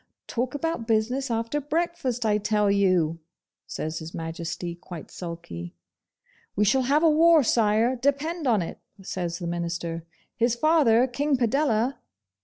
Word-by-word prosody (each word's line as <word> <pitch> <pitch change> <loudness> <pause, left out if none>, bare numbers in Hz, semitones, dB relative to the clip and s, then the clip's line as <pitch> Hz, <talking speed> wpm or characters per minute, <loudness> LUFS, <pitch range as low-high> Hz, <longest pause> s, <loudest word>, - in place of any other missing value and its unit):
'Talk 250 +3 -3
about 305 -6 -2
business 245 +5 0
after 230 +5 -1
breakfast, 290 -6 -1
I 210 -1 +2
tell 210 -1 +2
you!' 185 -5 +2 0.5
says 155 0 -4
His 160 +1 -8
Majesty, 170 +1 -4
quite 170 -1 -10
sulky. 85 - -7 0.8
'We 210 - +2
shall 260 +6 +3
have 300 +3 +3
a 325 - +6
war, 325 0 +6
Sire, 225 +2 +2
depend 285 +5 -1
on 215 -7 +3
it,' - - -7 0.2
says 175 -2 -3
the 175 - -6
Minister. 170 -1 -3 0.3
'His 235 0 +2
father, 255 -4 +4
King 280 +2 0
Padella. 245 0 +1
225 Hz, 140 wpm, -26 LUFS, 175-275 Hz, 0.8 s, a